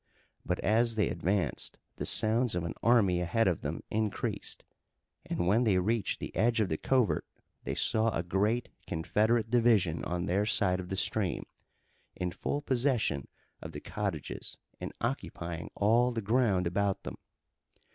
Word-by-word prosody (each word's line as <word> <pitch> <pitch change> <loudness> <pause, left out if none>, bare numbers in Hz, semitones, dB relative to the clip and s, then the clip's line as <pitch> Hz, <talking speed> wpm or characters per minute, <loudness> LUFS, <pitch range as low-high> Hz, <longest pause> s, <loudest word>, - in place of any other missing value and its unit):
But - - -1
as 115 +2 +3
they 105 - +2
advanced 90 +3 -1 0.2
the - - -3
sounds 115 0 +2
of 90 - -1
an 85 - -3
army 100 -7 +4
ahead 95 +6 +2
of 90 -4 +1
them - - -4
increased, 110 -1 -2 0.6
and 85 - -1
when 105 +7 +4
they 105 -6 +3
reached 105 +3 0
the - - -6
edge 115 +1 +2
of 105 -4 +2
the 80 - 0
covert 115 - +2 0.4
they - - -2
saw 110 -1 +2
a 85 -6 -1
great 105 +7 0 0.2
Confederate 110 +7 +1
division 110 -9 +3
on 90 0 -2
their 100 +4 +1
side 95 -4 +2
of 90 -1 -6
the 95 - -2
stream, 100 -1 0 0.7
in 90 -1 -2
full 145 +10 -3
possession 125 - +1 0.3
of - - -8
the - - -5
cottages - - -4 0.2
and - - -5
occupying 85 -1 -3
all 115 +4 +3
the 115 -2 -3
ground 105 -4 +2
about 100 +3 0
them. - - -6
105 Hz, 155 wpm, -31 LUFS, 90-115 Hz, 0.7 s, army